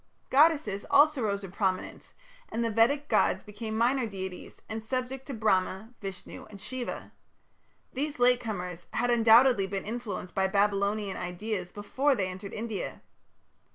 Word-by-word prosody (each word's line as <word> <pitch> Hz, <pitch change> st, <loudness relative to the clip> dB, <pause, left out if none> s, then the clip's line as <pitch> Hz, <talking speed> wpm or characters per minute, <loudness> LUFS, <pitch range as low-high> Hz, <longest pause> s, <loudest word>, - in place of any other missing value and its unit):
Goddesses 280 Hz, -9 st, +4 dB
also 290 Hz, -1 st, +5 dB
rose 200 Hz, -2 st, -1 dB
into 190 Hz, 0 st, -9 dB
prominence, 190 Hz, -3 st, -2 dB, 0.3 s
and 230 Hz, +1 st, -1 dB
the 230 Hz, -, 0 dB
Vedic 280 Hz, +7 st, +3 dB
gods -, -, +2 dB
became 220 Hz, +1 st, -5 dB
minor 245 Hz, +1 st, +2 dB
deities, 190 Hz, -3 st, -7 dB
and 220 Hz, 0 st, -5 dB
subject 255 Hz, +2 st, -3 dB
to 280 Hz, -, -5 dB
Brahma, 215 Hz, +1 st, 0 dB
Vishnu, 195 Hz, -2 st, -8 dB
and 200 Hz, -, -11 dB
Shiva. 240 Hz, +5 st, -5 dB, 0.8 s
These 290 Hz, +2 st, -3 dB
"late 245 Hz, 0 st, +4 dB
comers" 180 Hz, -7 st, -5 dB
had 245 Hz, 0 st, +1 dB
undoubtedly 230 Hz, -2 st, +6 dB
been 195 Hz, 0 st, -4 dB
influenced 210 Hz, -5 st, -5 dB
by 190 Hz, 0 st, +2 dB
Babylonian 200 Hz, +1 st, +1 dB
ideas 180 Hz, +1 st, -4 dB
before 265 Hz, +7 st, 0 dB
they 190 Hz, -5 st, -1 dB
entered 190 Hz, +2 st, -7 dB
India. 220 Hz, -2 st, -5 dB
215 Hz, 145 wpm, -29 LUFS, 195-245 Hz, 0.8 s, undoubtedly